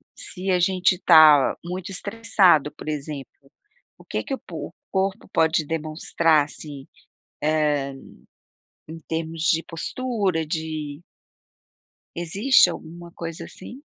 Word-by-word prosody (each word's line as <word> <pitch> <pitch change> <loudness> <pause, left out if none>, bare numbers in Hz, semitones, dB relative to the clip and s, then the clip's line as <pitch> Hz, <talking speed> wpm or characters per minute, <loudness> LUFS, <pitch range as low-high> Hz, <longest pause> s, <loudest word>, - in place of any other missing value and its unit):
se 190 +1 -4
a 180 - +3
gente 185 0 +2
tá 155 -4 +7
muito 180 +2 -6
estressado, 195 -7 +2
por - - -10
exemplo, 140 -1 -7 0.5
o - - -18
que - - -3
que 275 - -5
o - - -3
po - - -7
o - - -26 0.2
corpo 190 +2 -1
pode 160 -1 +2
demonstrar, 155 -1 +1
assim, 145 -2 -9 0.6
eh, 150 -3 +1 1.0
em 165 0 -8
termos 160 0 -4
de 165 -1 +3
postura, 195 -2 -2
de 155 -2 -4 1.2
Existe 180 +5 +4
alguma 170 +1 -9
coisa 165 -1 -7
assim? 250 +8 -11
165 Hz, 120 wpm, -23 LUFS, 155-185 Hz, 1.2 s, tá